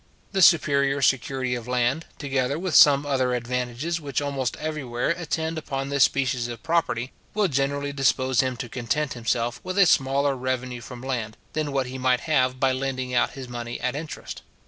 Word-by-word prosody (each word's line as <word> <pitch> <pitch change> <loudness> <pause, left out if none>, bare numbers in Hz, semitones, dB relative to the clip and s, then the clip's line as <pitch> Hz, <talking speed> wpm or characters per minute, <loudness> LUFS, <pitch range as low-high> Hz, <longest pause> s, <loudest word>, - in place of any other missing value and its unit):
The 190 - 0
superior 140 -5 +4
security 130 -1 +1
of 120 -1 -5
land, 125 +5 0
together 135 -1 -1
with 180 0 -3
some 145 0 +7
other 130 -3 +1
advantages 125 +7 -2
which 140 -3 -2
almost 140 -3 -2
everywhere 145 -6 -3
attend 160 -1 -2
upon 135 -2 -4
this 140 -1 +5
species 130 -3 -1
of 120 -2 -8
property, 150 -7 0 0.2
will 210 -2 +3
generally 140 -1 -1
dispose 130 -2 +1
him 130 -2 +1
to 120 - -5
content 130 +5 -2
himself 120 0 -1
with 185 +1 -4
a 200 - +7
smaller 140 -2 +2
revenue 130 -1 -3
from 125 0 -9
land, 120 -5 -3 0.2
than 155 -1 -1
what 135 -1 0
he 130 +1 -6
might 125 0 +2
have 130 -5 +1
by 135 0 +3
lending 130 -1 -3
out 120 - +2
his 135 -2 -8
money 120 -1 -5
at 125 +1 -2
interest. 150 +1 -7
135 Hz, 180 wpm, -25 LUFS, 125-145 Hz, 0.2 s, some